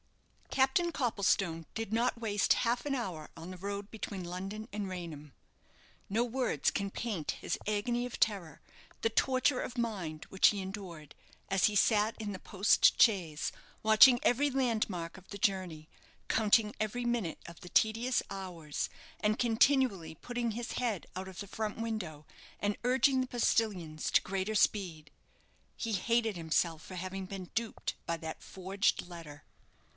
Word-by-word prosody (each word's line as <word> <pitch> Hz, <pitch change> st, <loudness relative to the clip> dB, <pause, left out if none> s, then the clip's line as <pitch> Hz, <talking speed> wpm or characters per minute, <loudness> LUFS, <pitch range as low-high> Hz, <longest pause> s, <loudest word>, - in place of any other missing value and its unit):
Captain 270 Hz, +6 st, +2 dB
Copplestone 195 Hz, -, +1 dB
did 225 Hz, -1 st, -3 dB
not 235 Hz, +1 st, +1 dB
waste 210 Hz, -4 st, +2 dB
half 240 Hz, +3 st, +1 dB
an 285 Hz, -, 0 dB
hour 185 Hz, -, -4 dB
on 165 Hz, +3 st, -8 dB
the 185 Hz, -, -8 dB
road 200 Hz, +2 st, -4 dB
between 205 Hz, -3 st, -5 dB
London 195 Hz, +5 st, -5 dB
and 205 Hz, -2 st, -3 dB
Raynham. 160 Hz, -6 st, -7 dB, 0.8 s
No 220 Hz, +4 st, +2 dB
words 240 Hz, -, 0 dB
can 200 Hz, 0 st, -2 dB
paint 200 Hz, -11 st, -2 dB
his -, -, -2 dB
agony 235 Hz, +4 st, 0 dB
of 250 Hz, -, -6 dB
terror, 195 Hz, -7 st, 0 dB, 0.4 s
the 225 Hz, -, +1 dB
torture 255 Hz, +2 st, +2 dB
of 245 Hz, -, -6 dB
mind 190 Hz, -10 st, -3 dB
which 190 Hz, -, +4 dB
he 205 Hz, -, +2 dB
endured, 190 Hz, -6 st, -7 dB, 0.4 s
as 195 Hz, -1 st, +3 dB
he 210 Hz, -, +2 dB
sat 215 Hz, +2 st, +3 dB
in 210 Hz, -2 st, -3 dB
the 185 Hz, -, -6 dB
post 200 Hz, +1 st, +4 dB
chaise, 175 Hz, -9 st, +3 dB, 0.3 s
watching 220 Hz, +3 st, +8 dB
every 280 Hz, +4 st, +3 dB
landmark 220 Hz, -11 st, -1 dB
of 190 Hz, -, -16 dB
the 200 Hz, -, -6 dB
journey, 185 Hz, -6 st, -1 dB, 0.4 s
counting 215 Hz, -1 st, +3 dB
every 240 Hz, +3 st, -1 dB
minute 235 Hz, -9 st, -1 dB
of 170 Hz, -1 st, -11 dB
the 180 Hz, -, -9 dB
tedious 230 Hz, +6 st, +2 dB
hours, 175 Hz, -6 st, -4 dB, 0.3 s
and 215 Hz, +1 st, +1 dB
continually 230 Hz, -, +3 dB
putting 240 Hz, +6 st, -3 dB
his 235 Hz, +2 st, -4 dB
head 230 Hz, -7 st, -1 dB
out 190 Hz, +1 st, -4 dB
of 190 Hz, -1 st, -9 dB
the 200 Hz, -, -5 dB
front 215 Hz, +1 st, -3 dB
window, 205 Hz, -10 st, -4 dB, 0.3 s
and 205 Hz, 0 st, 0 dB
urging 260 Hz, +2 st, +4 dB
the 255 Hz, -, -2 dB
postillions 200 Hz, -10 st, 0 dB
to -, -, +5 dB
greater 195 Hz, +2 st, -2 dB
speed. 175 Hz, -8 st, +1 dB, 0.7 s
He 225 Hz, -2 st, -2 dB
hated 225 Hz, +2 st, +1 dB
himself 165 Hz, -1 st, 0 dB
for 185 Hz, -, -9 dB
having 185 Hz, +1 st, -4 dB
been 185 Hz, -1 st, -7 dB
duped 230 Hz, -1 st, -2 dB
by 170 Hz, -, 0 dB
that 160 Hz, 0 st, -6 dB
forged 190 Hz, 0 st, -1 dB
letter. 165 Hz, -4 st, -10 dB
205 Hz, 155 wpm, -32 LUFS, 180-230 Hz, 0.8 s, watching